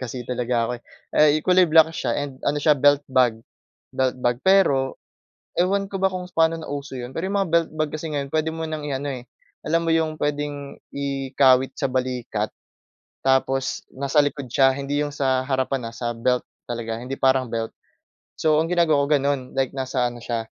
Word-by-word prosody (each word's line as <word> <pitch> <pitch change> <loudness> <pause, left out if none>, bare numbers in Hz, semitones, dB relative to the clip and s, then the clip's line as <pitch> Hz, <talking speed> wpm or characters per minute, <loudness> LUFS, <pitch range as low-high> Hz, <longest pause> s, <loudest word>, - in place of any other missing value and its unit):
kasi 125 -1 -5
talaga 120 -1 0
ako, - - -2
eh. - - -42 0.5
Eh, - - -1
kulay 180 -1 +5
black 160 0 +6
siya 120 -7 -2
and 140 -2 -5
ano 145 - +1
siya 150 +1 +5
belt 145 +1 +4
bag. 125 -4 +3 0.6
Belt 130 -1 0
bag, 120 0 0
pero 145 -9 +3 0.6
ewan 195 +2 +1
ko 195 - -3
ba - - +5
kung 180 -1 -5
paano 165 -1 +3
na 160 - -8
uso 140 -1 -5
'yon, 125 -1 -6
pero 165 +7 -3
'yong 195 - -3
mga 195 -4 0
belt 165 -1 +2
bag 155 -1 -1
kasi 155 +1 -4
ngayon 140 -1 -3
puwede 155 +1 0
mo 165 - -5
nang 155 -1 -5
i-ano, 140 0 -3
eh, 125 -2 -6 0.4
alam 165 +2 +2
mo - - +1
'yong 160 -1 +1
puwedeng 145 -1 -3 0.2
ikawit 135 -1 +2
sa 135 - -2
balikat 125 -4 -2 0.8
tapos 135 0 +1
nasa 140 +2 +2
likod 140 -2 -3
siya 135 +1 +4
hindi 140 +1 -1
'yong 145 0 -2
sa 130 -2 +1
harapan 130 -2 -1
ha, - - -12
sa 120 0 -3
belt 125 +2 0 0.2
talaga, 115 -1 -4
hindi 130 +2 -5
parang 130 -2 +2
belt. 115 0 -3 0.7
So 155 -1 +3
ang 165 - -4
ginagawa 160 -5 +3
ko - - -8
gano'n 140 0 0 0.2
like 135 -1 0
nasa 130 -2 -1
ano 120 -1 -6
siya 115 -1 -3
140 Hz, 195 wpm, -23 LUFS, 130-155 Hz, 0.8 s, black